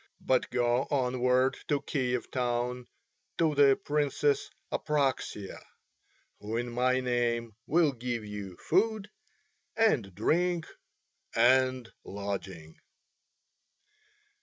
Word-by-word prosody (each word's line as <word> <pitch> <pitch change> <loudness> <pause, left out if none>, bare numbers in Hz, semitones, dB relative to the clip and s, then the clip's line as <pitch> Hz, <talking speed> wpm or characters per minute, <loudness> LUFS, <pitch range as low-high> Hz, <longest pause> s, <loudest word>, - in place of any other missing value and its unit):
But 130 -1 +1
go 120 +1 +1
onward 130 -1 +2
to 145 -2 +1
Kiev 125 -4 -2
town 125 0 -2 0.5
to 160 -2 +2
the 140 -2 +6
Princess 145 0 0 0.2
Apraxia, 135 -9 -1 0.8
who 110 +2 -4
in 120 0 -3
my 130 +2 +2
name 120 -2 -1
will 160 -2 +3
give 120 -3 -4
you 100 -3 -7
food 210 +3 0 0.7
and 130 - +2
drink 170 - +1 0.7
and 130 +1 +3 0.2
lodging." 95 -5 -6
125 Hz, 90 wpm, -29 LUFS, 115-145 Hz, 0.8 s, the